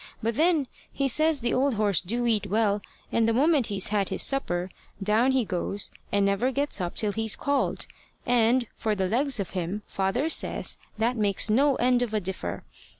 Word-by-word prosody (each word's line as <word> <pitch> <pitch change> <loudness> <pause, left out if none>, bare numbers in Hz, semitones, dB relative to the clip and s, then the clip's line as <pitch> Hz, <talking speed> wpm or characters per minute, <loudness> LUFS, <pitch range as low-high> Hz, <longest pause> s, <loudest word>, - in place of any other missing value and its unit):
But 230 0 -1
then 320 -1 +2 0.3
he 275 - -1
says 310 +2 +3
the 240 0 0
old 265 -1 +1
horse 205 -4 +1
do 235 +7 -1
eat 215 -4 +1
well, 210 0 +1 0.3
and 230 -1 +2
the 230 - +2
moment 290 -1 +3
he's 195 -2 0
had 205 -2 0
his - - 0
supper, 185 -10 -1 0.3
down 220 +6 +3
he 260 -3 +1
goes, 195 +1 -2 0.2
and 200 0 +2
never 200 +6 +1
gets 280 -6 -1
up 175 -1 -3
till 210 -2 +1
he's 220 +1 0
called; 285 -1 -1 0.4
and, 245 0 +3
for 215 -1 -1
the 190 -2 -1
legs 260 +4 +1
of 195 - -3
him, 185 +3 -4
father 195 +10 -1
says 325 - +1 0.2
that 235 +3 0
makes 205 0 +1
no 275 +5 +3
end 250 0 +2
of 225 -3 -2
a - - +2
differ. 190 -1 -4
225 Hz, 195 wpm, -26 LUFS, 200-260 Hz, 0.4 s, says